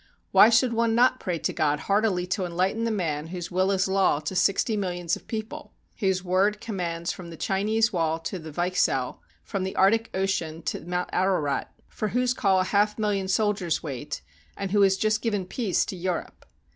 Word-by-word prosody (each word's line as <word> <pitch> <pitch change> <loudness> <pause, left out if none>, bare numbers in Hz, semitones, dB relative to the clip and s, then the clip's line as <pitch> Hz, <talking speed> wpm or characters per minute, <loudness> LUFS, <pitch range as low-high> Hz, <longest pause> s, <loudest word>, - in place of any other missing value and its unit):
Why 215 - +8
should 235 +1 +3
one 230 0 +1
not 255 +2 +4
pray 180 -3 -2
to - - -2
God 150 -1 +1
heartily 200 -3 +1
to 185 +1 -2
enlighten 185 +6 0
the - - +1
man 160 -8 -2
whose 175 0 -6
will 185 +2 +2
is 190 -1 +1
law 190 -6 +2
to 155 +5 -4
sixty 195 +4 +2
millions 175 -4 -1
of - - -14
people, 220 -1 -6 0.3
whose 190 -3 +1
word 190 +3 +2
commands 175 -6 -3
from 175 -2 -9
the 165 - -9
Chi 195 +3 -1
nese 220 +1 +2
wall 165 -2 +1
to 180 +3 -4
the 160 -1 -9
Weichsel, 175 -6 0 0.2
from 195 -3 -3
the 190 - -4
Arctic 225 +4 +3
Ocean 170 -4 -1
to - - -3
Mount 180 +2 -3
Ararat; 180 -7 0 0.2
for 215 - -3
whose 250 +3 +1
call 195 -6 +2
a - - +2
half 205 +2 +1
million 205 -3 0
soldiers 195 -4 0
wait, 145 -1 -5 0.3
and 195 -2 -4
who 205 0 +3
has 195 -1 +4
just 215 +1 +1
given 205 -5 -1
peace 200 0 0
to - - -5
Europe? 180 0 -4
190 Hz, 195 wpm, -26 LUFS, 175-210 Hz, 0.3 s, Why